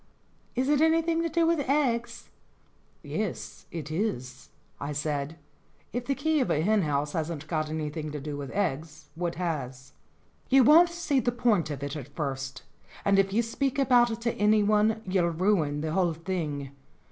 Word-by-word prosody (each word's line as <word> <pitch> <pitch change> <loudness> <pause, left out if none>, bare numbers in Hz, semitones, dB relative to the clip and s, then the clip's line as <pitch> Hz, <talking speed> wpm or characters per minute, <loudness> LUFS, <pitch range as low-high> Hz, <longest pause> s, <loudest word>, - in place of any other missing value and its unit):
"Is 255 +2 0
it 295 0 +3
anything 325 +1 +3
to 335 - -1
do 335 +1 +2
with 335 -1 +2
eggs 235 -5 0 0.3
?" - - -37
"Yes, - - -5
it 155 -3 -6
is," 135 - -3 0.3
I 145 +1 -4
said. 145 +1 -2 0.6
If 245 0 -3
the 275 - +1
key 315 +1 +1
of 255 - 0
a 150 - +2
hen 215 +2 +3
house 145 -2 -1
hasn't 160 -2 -3
got 155 -1 -2
anything 155 0 -4
to 150 - -4
do 145 +1 -5
with 140 -2 -6
eggs, 155 -4 -3
what 170 +1 -3
has? 135 -7 -4 0.6
"You 270 0 +6
won't 330 +7 +7
see 340 -5 0
the 245 0 +1
point 225 -9 +1
of 140 -2 -5
it 140 +1 -4
at 145 -1 -8
first, 135 -3 -4 0.4
and 200 0 +4
if 195 0 +2
you 230 +4 +2
speak 270 +4 -2
about 250 -3 +4
it 225 0 -5
to 235 0 0
anyone 215 +1 +3
you'll 185 -2 +1
ruin 165 -4 +1
the 155 0 -2
whole 175 -1 +2
thing. 155 -5 -4
180 Hz, 180 wpm, -28 LUFS, 150-240 Hz, 0.6 s, won't